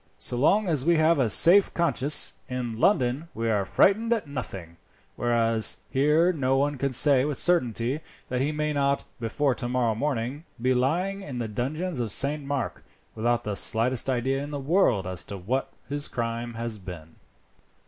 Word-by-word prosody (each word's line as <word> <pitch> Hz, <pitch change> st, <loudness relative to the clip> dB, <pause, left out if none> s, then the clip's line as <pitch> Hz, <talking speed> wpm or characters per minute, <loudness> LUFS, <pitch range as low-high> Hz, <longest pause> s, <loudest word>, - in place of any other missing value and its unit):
"So -, -, -3 dB
long 195 Hz, -, +2 dB
as 155 Hz, -6 st, 0 dB
we 170 Hz, +2 st, +2 dB
have 160 Hz, 0 st, +2 dB
a 125 Hz, -4 st, +1 dB
safe 180 Hz, -, +6 dB
conscience, 150 Hz, -4 st, +3 dB, 0.2 s
in 120 Hz, -3 st, -5 dB
London 135 Hz, -2 st, +1 dB
we 115 Hz, 0 st, -2 dB
are 100 Hz, -2 st, 0 dB
frightened 215 Hz, -, +2 dB
at 225 Hz, -, -3 dB
nothing, 95 Hz, -, -8 dB, 0.4 s
whereas 115 Hz, -2 st, +3 dB
here 150 Hz, +6 st, +2 dB
no 135 Hz, -4 st, 0 dB
one 145 Hz, 0 st, -1 dB
can 140 Hz, 0 st, -1 dB
say 130 Hz, +1 st, +5 dB
with 145 Hz, -1 st, -2 dB
certainty 125 Hz, -5 st, +2 dB, 0.3 s
that 125 Hz, 0 st, -2 dB
he 145 Hz, +3 st, 0 dB
may 150 Hz, 0 st, -2 dB
not, 140 Hz, -1 st, 0 dB, 0.2 s
before 125 Hz, +4 st, -1 dB
tomorrow 120 Hz, -2 st, -1 dB
morning, 130 Hz, +3 st, -3 dB, 0.2 s
be 130 Hz, +2 st, +1 dB
lying 175 Hz, +11 st, -1 dB
in 140 Hz, -9 st, -8 dB
the 120 Hz, -2 st, -3 dB
dungeons 140 Hz, -, -4 dB
of 115 Hz, -3 st, -3 dB
St. 145 Hz, +6 st, +1 dB
Mark, 140 Hz, -3 st, -4 dB, 0.3 s
without 120 Hz, +1 st, -1 dB
the 105 Hz, -, -4 dB
slightest 115 Hz, +6 st, 0 dB
idea 130 Hz, +2 st, -1 dB
in 145 Hz, -, -6 dB
the 145 Hz, -1 st, -5 dB
world 135 Hz, -, +1 dB
as 90 Hz, -1 st, -3 dB
to 100 Hz, -, -8 dB
what 120 Hz, +9 st, -3 dB, 0.2 s
his 145 Hz, +2 st, -3 dB
crime 115 Hz, 0 st, -5 dB
has 115 Hz, -2 st, -4 dB
been." 85 Hz, -4 st, -11 dB
130 Hz, 175 wpm, -25 LUFS, 115-150 Hz, 0.4 s, safe